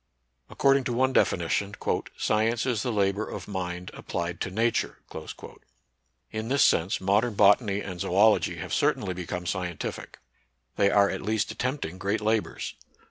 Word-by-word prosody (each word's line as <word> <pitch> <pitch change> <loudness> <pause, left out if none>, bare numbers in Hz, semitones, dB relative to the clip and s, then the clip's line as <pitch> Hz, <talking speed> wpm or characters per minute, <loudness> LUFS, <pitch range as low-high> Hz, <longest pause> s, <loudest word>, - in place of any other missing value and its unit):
According 135 0 +3
to 120 - -1
one 130 +2 +2
definition, 100 +2 +1 0.4
"Science 115 +2 +1
is 120 -5 0
the 125 - -1
labor 100 0 0
of - - -7
mind 90 -2 -4
applied 85 0 -4
to - - -1
Nature." 115 +5 0 1.3
In 110 +1 -4
this 140 +3 +3
sense, 85 +3 +3
modern 105 +4 +1
bot 100 +4 +6
any 100 -3 -2
and 90 -3 -6
zoology 105 +4 +3
have - - -6
certainly 95 - +1
become 90 0 -5
scien 90 -1 -3
tific. - - -6 0.6
They 100 - +3
are 100 -1 +4
at 95 - -4
least 110 +1 -1
attempting 130 - -3
great 100 +3 0
labors. 110 0 -1
100 Hz, 150 wpm, -27 LUFS, 95-110 Hz, 1.3 s, bot